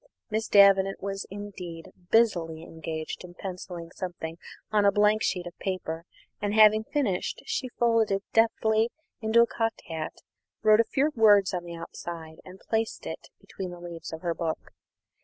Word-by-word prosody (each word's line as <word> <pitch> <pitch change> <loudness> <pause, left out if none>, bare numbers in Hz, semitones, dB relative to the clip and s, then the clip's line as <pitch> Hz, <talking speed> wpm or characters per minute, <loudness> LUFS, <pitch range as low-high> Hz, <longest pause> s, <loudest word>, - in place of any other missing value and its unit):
Miss 220 +1 -1
Davenant 195 -1 +6
was 195 0 -3
indeed 190 -5 -8 0.2
busily 170 -8 +2
engaged 160 0 -6
in 175 -1 -11
pencilling 180 -3 -7
something 170 -3 -6 0.3
on 210 -1 +3
a 200 - +6
blank 210 +2 +3
sheet 180 -5 0
of 175 - -8
paper; 170 -3 -3 0.4
and, 205 0 -1
having 215 0 +7
finished, 220 -12 -1
she 255 - -2
folded 230 -2 +3
it 195 - -4
deftly 225 0 +3 0.3
into 225 +1 +5
a - - +3
cocked 225 -1 -2
hat, 160 -1 -4 0.5
wrote 215 0 +6
a 230 - +5
few 290 +3 +2
words 205 -5 +5
on 175 -1 -3
the 170 0 -7
outside, 165 -1 -8
and 185 +1 -12
placed 225 0 -1
it - - -6
between 190 -2 -7
the 175 0 -9
leaves 170 -1 -8
of 160 0 -7
her 170 -2 0
book. 165 -1 -4
195 Hz, 165 wpm, -27 LUFS, 170-220 Hz, 0.5 s, having